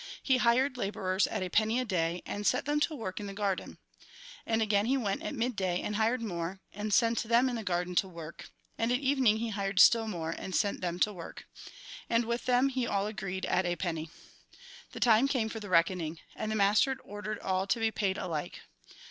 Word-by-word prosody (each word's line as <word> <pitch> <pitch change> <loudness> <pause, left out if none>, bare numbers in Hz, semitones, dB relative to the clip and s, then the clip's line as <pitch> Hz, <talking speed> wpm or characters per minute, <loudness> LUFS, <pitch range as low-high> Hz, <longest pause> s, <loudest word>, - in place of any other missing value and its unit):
He 260 -2 +3
hired 250 +2 +2
labourers 195 -3 0
at - - -3
a 185 - -3
penny 220 +5 +2
a 255 - -1
day, 175 -4 -1
and 205 0 -3
set - - +2
them 295 +1 +1
to 305 +1 0
work 205 -8 -5
in 205 - -5
the 195 - -7
garden. 200 -2 -2 0.7
And 225 0 +1
he - - +3
again 215 +6 +2
went 200 +7 -1
at 315 - -4
mid 245 0 -1
day 185 -2 0
and 210 - -3
hired 230 +3 +1
more, 180 -2 -4
and 210 +1 -4
sent 230 +2 +3
them 235 +3 +3
into 245 -2 -2
the - - -6
garden 180 -2 -1
to 195 - +3
work; 165 -3 -10 0.3
and 230 +1 +1
at 250 - +3
evening 265 -5 +3
he 230 +1 -2
hired 195 -2 -2
still 225 0 +7
more, 165 -6 -3
and 185 +2 -5
sent 205 -2 0
them 175 -1 -2
to 210 - +3
work. 170 -3 -9 0.6
And 230 0 +2
with 235 +1 -2
them 255 +2 +3 0.2
all 200 0 0
he - - -2
agreed 190 -3 -4
at 185 0 +1
a 175 - 0
penny. 165 -2 -3 0.8
The - - -8
time 235 +2 +5
came 250 -6 0
for 225 - -5
the 205 -2 -8
reckoning. 170 -2 +2 0.2
And 215 0 -3
the - - -1
master 215 +6 +3
ordered 205 +1 -5
all 190 0 -1
to 230 - +1
be 225 0 +1
paid 200 -3 -1
alike. 155 -4 -4
210 Hz, 220 wpm, -30 LUFS, 185-235 Hz, 0.8 s, still